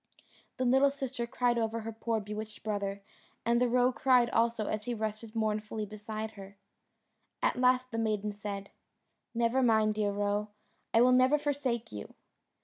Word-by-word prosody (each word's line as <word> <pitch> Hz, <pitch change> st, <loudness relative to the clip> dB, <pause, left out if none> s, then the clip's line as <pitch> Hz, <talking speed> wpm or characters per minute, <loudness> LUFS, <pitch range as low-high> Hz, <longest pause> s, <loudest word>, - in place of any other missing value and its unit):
The 255 Hz, -, 0 dB
little 265 Hz, +3 st, +5 dB
sister 265 Hz, -4 st, -4 dB
cried 240 Hz, 0 st, +1 dB
over 225 Hz, 0 st, -1 dB
her 225 Hz, +1 st, -5 dB
poor 225 Hz, 0 st, -1 dB
bewitched 210 Hz, +1 st, -7 dB
brother, 200 Hz, -2 st, -2 dB, 0.4 s
and 235 Hz, +1 st, +3 dB
the 250 Hz, -, +3 dB
roe 250 Hz, +1 st, +4 dB
cried 250 Hz, -2 st, +3 dB
also 230 Hz, -1 st, +1 dB
as 210 Hz, 0 st, -3 dB
he 245 Hz, -, -2 dB
rested 220 Hz, +1 st, -4 dB
mournfully 215 Hz, -1 st, -1 dB
beside 215 Hz, +1 st, -6 dB
her. 200 Hz, -1 st, -12 dB, 0.9 s
At -, -, +3 dB
last 255 Hz, 0 st, +3 dB
the 225 Hz, -, -2 dB
maiden 210 Hz, -2 st, 0 dB
said, 200 Hz, -1 st, -6 dB, 0.6 s
"Never 235 Hz, +3 st, +2 dB
mind, 220 Hz, -3 st, +4 dB
dear 210 Hz, -1 st, 0 dB
Roe, 205 Hz, +1 st, 0 dB, 0.4 s
I 230 Hz, -, +5 dB
will 250 Hz, +1 st, +6 dB
never 255 Hz, +3 st, +5 dB
forsake 275 Hz, -5 st, -2 dB
you." 105 Hz, -1 st, -8 dB
225 Hz, 160 wpm, -31 LUFS, 210-245 Hz, 0.9 s, will